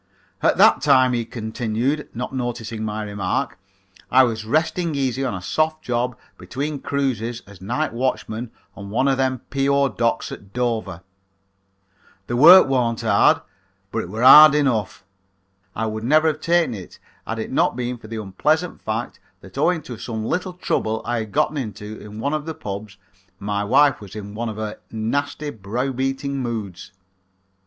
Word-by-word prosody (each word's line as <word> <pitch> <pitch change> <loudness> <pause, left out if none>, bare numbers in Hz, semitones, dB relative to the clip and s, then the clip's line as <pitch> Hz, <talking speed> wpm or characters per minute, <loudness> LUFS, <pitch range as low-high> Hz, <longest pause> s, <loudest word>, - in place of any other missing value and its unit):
"At - - +3
that - - +6
time," 130 -3 +4
he 120 -1 -1
continued, 115 +5 -2
not 125 +3 -4
noticing 120 -3 -4
my 110 0 -3
remark, 100 -2 -2 0.5
"I 130 +1 +6
was 110 -3 -1
resting 160 +5 0
easy 135 -1 -1
on 125 -7 -2
a 90 - -7
soft 155 +7 0
job 125 0 -1 0.2
between 145 +2 -4
cruises 120 -5 -2
as 100 -3 -15
night 125 +10 -2
watchman 120 -2 -2 0.3
on 100 0 -9
one 120 +6 +1
of 135 -1 +2
them 130 -2 0
P.O. 140 0 +2
docks 115 -2 -1
at 100 0 -10
Dover. 115 -8 -2 1.2
The 120 - -3
work 170 +8 +9
warn't 120 -4 0
hard, 110 -3 +4 0.5
but - - -2
it - - -5
was 110 +5 -3
hard 150 +3 +10
enough. 125 -9 0 0.7
I 110 - -1
would 110 0 -4
never 155 +6 +4
have 155 0 -4
taken 170 -5 +2
it 95 -4 -9 0.3
had - - -3
it - - -5
not - - +2
been 125 0 -3
for 110 - -12
the 110 0 -5
unpleasant 155 - 0
fact 110 +2 -4 0.2
that - - -14
owing 175 -3 +1
to 120 -4 -8
some 110 -2 -4
little 180 +7 -2
trouble 110 -10 -2
I 120 0 -1
had 110 -2 -5
gotten 150 +9 +1
into 110 -4 -6
at 105 - -10
one 110 +8 -3
of 155 0 -3
the 160 - -4
pubs 100 0 -7 0.4
my 100 +1 -2
wife 135 +3 +4
was 100 0 -11
in 100 -1 -7
one 115 +2 -3
of 110 - -7
her 110 -1 -5
nasty, 145 +6 -2
brow 115 +5 -3
beating 135 +2 -2
moods. 110 -8 -5
120 Hz, 170 wpm, -22 LUFS, 110-140 Hz, 1.2 s, hard